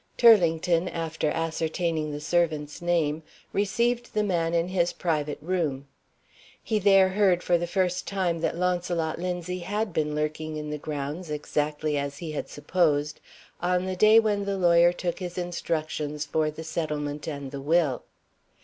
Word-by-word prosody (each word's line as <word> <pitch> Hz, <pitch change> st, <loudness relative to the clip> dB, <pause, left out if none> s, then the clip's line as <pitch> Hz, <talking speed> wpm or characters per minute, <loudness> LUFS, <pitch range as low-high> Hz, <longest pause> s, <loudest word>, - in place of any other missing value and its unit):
Turlington 175 Hz, -6 st, +5 dB
(after 160 Hz, -3 st, -2 dB
ascertaining 165 Hz, 0 st, -1 dB
the 145 Hz, -, -4 dB
servant's 155 Hz, -2 st, -1 dB
name) 165 Hz, -3 st, +1 dB, 0.3 s
received 235 Hz, +4 st, 0 dB
the 210 Hz, -, +2 dB
man 170 Hz, -4 st, 0 dB
in 170 Hz, +1 st, +1 dB
his 175 Hz, -2 st, +1 dB
private 150 Hz, -4 st, -1 dB
room. 155 Hz, -6 st, -1 dB, 0.8 s
He 215 Hz, -2 st, 0 dB
there 195 Hz, -1 st, +5 dB
heard, 190 Hz, -2 st, +2 dB
for 175 Hz, -, +3 dB
the 175 Hz, -, -2 dB
first 180 Hz, 0 st, 0 dB
time, 180 Hz, -4 st, -1 dB
that 165 Hz, -, -1 dB
Launcelot 175 Hz, -3 st, -1 dB
Linzie 180 Hz, 0 st, -3 dB
had 205 Hz, +2 st, -2 dB
been 150 Hz, -1 st, 0 dB
lurking 155 Hz, +1 st, -2 dB
in 150 Hz, 0 st, -5 dB
the 150 Hz, -, -4 dB
grounds 150 Hz, +3 st, -5 dB
(exactly 150 Hz, 0 st, -1 dB
as 140 Hz, 0 st, -4 dB
he 165 Hz, -1 st, -6 dB
had 150 Hz, -, -4 dB
supposed) 150 Hz, -1 st, 0 dB, 0.4 s
on 180 Hz, +1 st, +1 dB
the 185 Hz, 0 st, -2 dB
day 215 Hz, +4 st, +7 dB
when 205 Hz, -2 st, 0 dB
the 200 Hz, -1 st, -1 dB
lawyer 175 Hz, -1 st, +5 dB
took 175 Hz, 0 st, -3 dB
his 180 Hz, -1 st, -6 dB
instructions 155 Hz, -4 st, -3 dB
for 155 Hz, 0 st, 0 dB
the 155 Hz, +1 st, -8 dB
Settlement 150 Hz, -2 st, -3 dB
and 140 Hz, -3 st, -5 dB
the 140 Hz, -1 st, -6 dB
Will. 155 Hz, -2 st, +2 dB
170 Hz, 160 wpm, -26 LUFS, 150-180 Hz, 0.8 s, day